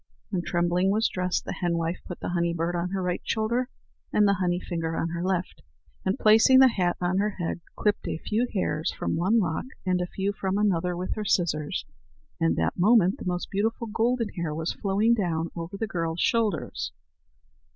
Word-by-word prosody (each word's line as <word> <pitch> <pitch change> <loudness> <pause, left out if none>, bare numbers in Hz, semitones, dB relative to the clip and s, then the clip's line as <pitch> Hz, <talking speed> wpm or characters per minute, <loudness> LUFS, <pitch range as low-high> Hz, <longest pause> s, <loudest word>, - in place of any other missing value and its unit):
When 185 -4 0
Trembling 175 +1 +1
was 215 +3 +3
dressed, 180 0 -1
the - - -3
henwife 170 -1 -1
put 180 - -7
the - - -3
honey 170 -1 0
bird 170 +1 -1
on 175 +1 -1
her 190 0 -2
right 180 -1 -1
shoulder 235 +3 0 0.4
and 210 -1 +4
the 200 - +4
honey 175 -1 +1
finger 165 -3 -3
on 165 - -1
her 170 0 -3
left, 185 -1 -2 0.4
and, 190 +1 0
placing 220 +5 +6
the 265 0 +8
hat 180 -6 0
on 180 +1 +1
her 210 0 0
head, 170 0 -2
clipped 210 -1 0
a - - -2
few 220 +8 -1
hairs 165 -6 -1
from - - -2
one 185 +8 +2
lock 175 -7 0 0.2
and 180 -1 +1
a 180 - -1
few 195 +2 -2
from 195 0 -1
another 180 -4 +1
with 180 +1 -2
her 215 - -4
scissors, 155 -6 0 0.5
and 80 0 +2
that 80 - -1
moment 200 -1 +4
the - - -7
most 180 -1 -2
beautiful 225 +4 0
golden 230 +1 0
hair 170 -6 -3
was 160 +1 -2
flowing 205 +3 +2
down 170 -6 -1
over 170 +3 -5
the 225 - -1
girl's 165 -4 -3
shoulders. 230 0 0
180 Hz, 195 wpm, -26 LUFS, 170-210 Hz, 0.5 s, the